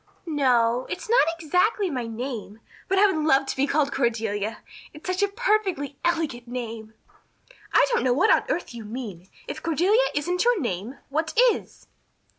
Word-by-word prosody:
"No 295 -5 0
o 230 +2 +1
o, - - -12
it's - - -5
not 465 -7 +4
exactly 360 +6 +1
my 250 -4 -3
name, 225 -2 -6 0.3
but 385 - +1
I 405 - +6
would 320 -6 +1
love 275 -3 +4
to - - -3
be 275 +2 +1
called 285 -1 +1
Cordelia. 225 -3 -1 0.3
It's 300 - -13
such 370 +1 -1
a 405 - +4
perfectly 400 - 0
elegant 315 -8 -1
name." 230 -3 -6 0.8
"I - - +5
don't 475 - +1
know 255 - +2
what 350 - +4
on - - +2
earth 345 - -2
you 235 -2 -8
mean. 210 -6 -7 0.2
If - - -6
Cordelia 380 - +2
isn't 355 +5 0
your 480 -3 +3
name, 225 - -4
what 315 +6 -2
is?" - - -8
285 Hz, 180 wpm, -25 LUFS, 235-365 Hz, 0.8 s, I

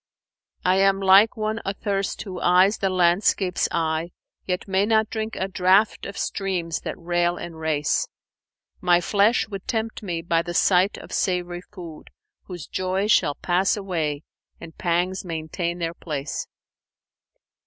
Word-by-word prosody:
I 185 +1 +4
am 195 0 +3
like 195 +4 +5
one 215 +1 -2
athirst 195 0 -2
who 185 -4 -7
eyes 185 +4 +4
the 195 - +1
landscape's 180 +1 +2
eye, 165 +1 -1
* - - -54
Yet 180 +1 -2
may 190 0 +2
not 220 0 +2
drink 220 0 -3
a 190 - -2
draught 190 +3 +2
of 200 - -8
streams 180 -5 -2
that - - -5
rail 175 0 0
and 165 -2 -8
race. 155 -2 0 0.7
My 175 -1 +4
flesh 205 +7 +2
would 195 -2 -7
tempt 225 -1 -2
me 175 -5 -4
by 165 -1 +1
the 175 0 -6
sight 185 +3 +3
of - - -11
savoury 175 -2 -1
food 175 -5 -11 0.2
* - - -60
Whose 175 -4 -8
joys 190 +3 -1
shall 145 -7 +3
pass 185 +4 +1
away 160 -7 -2 0.4
and 165 -1 -11
pangs 180 +2 -1
maintain 170 0 -3
their 165 -1 -3
place.' 150 -4 -5
180 Hz, 155 wpm, -24 LUFS, 170-195 Hz, 0.7 s, like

